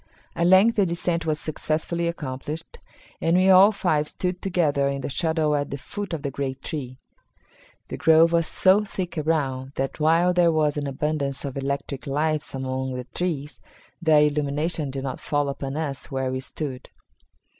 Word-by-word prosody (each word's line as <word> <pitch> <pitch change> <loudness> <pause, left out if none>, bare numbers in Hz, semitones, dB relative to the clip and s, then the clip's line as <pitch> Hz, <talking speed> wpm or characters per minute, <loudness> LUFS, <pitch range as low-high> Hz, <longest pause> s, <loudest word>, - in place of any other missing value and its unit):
At 170 - +2
length 195 +6 +6
the 200 - +4
descent 170 0 -1
was 155 -1 0
successfully 160 +2 -2
accomplished, 150 0 -5 0.4
and 165 +2 +3
we 190 +1 +5
all 190 +3 +8
five 155 -7 0
stood 180 +2 -3
together 155 -7 +1
in 140 0 -2
the - - -4
shadow 160 +1 +1
at 145 -1 -1
the 140 - -4
foot 205 +8 -6
of 160 -3 -4
the 140 - -2
great 135 -1 -4
tree. 130 -5 -5 0.9
The - - -5
grove 160 +1 +5
was 170 -2 +2
so 195 +3 +4
thick 185 -4 -5
around 140 -4 -1
that 135 +2 -3
while 165 +4 +3
there 175 -1 +4
was 155 -2 +1
an 145 -1 -2
abundance 140 0 -2
of 135 - -5
electric 140 0 -3
lights 150 +1 -1
among 130 0 -3
the 125 -1 -5
trees, 155 -5 -3 0.4
their 155 -3 +5
illumination 150 +1 0
did 135 0 -5
not 130 -2 -4
fall 145 -1 0
upon 140 0 -4
us 145 -4 -4
where 130 -1 -2
we 130 - -2
stood. 130 -1 -6
150 Hz, 175 wpm, -24 LUFS, 140-170 Hz, 0.9 s, all